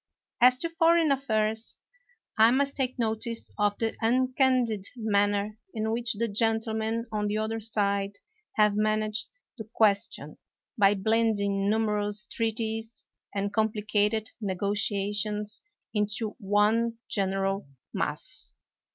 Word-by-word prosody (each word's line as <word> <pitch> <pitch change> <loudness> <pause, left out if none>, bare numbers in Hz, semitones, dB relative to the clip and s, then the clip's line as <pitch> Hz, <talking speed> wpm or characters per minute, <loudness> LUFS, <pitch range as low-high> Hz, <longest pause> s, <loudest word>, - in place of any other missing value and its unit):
As 250 +1 +7
to 335 +5 -2
foreign 330 -2 +4
affairs, 220 -4 -1 0.6
I 220 +1 +6
must 280 +3 +1
take 260 -2 -2
notice 225 0 -2
of 205 0 +2
the 225 -1 -1
uncandid 250 -3 +2
manner 205 -1 0 0.2
in 220 0 -1
which 235 +1 0
the 230 +2 -1
gentlemen 225 +1 0
on 210 -1 -1
the 210 +1 -1
other 220 +1 -2
side 200 -2 -1 0.4
have 210 -1 +4
managed 215 0 0 0.3
the 220 0 -7
question 205 -3 +1 0.4
by 205 -3 +4
blend 220 +2 +2
ing 200 0 0
numerous 210 -1 0
treaties 225 0 -3 0.3
and 200 0 -1
complicated 215 0 0
negotia 200 +1 -1
tions 210 0 -2 0.3
into 210 +1 0
one 215 +3 +2
general 195 -2 -1 0.3
mass. - - -3
215 Hz, 115 wpm, -28 LUFS, 205-230 Hz, 0.6 s, As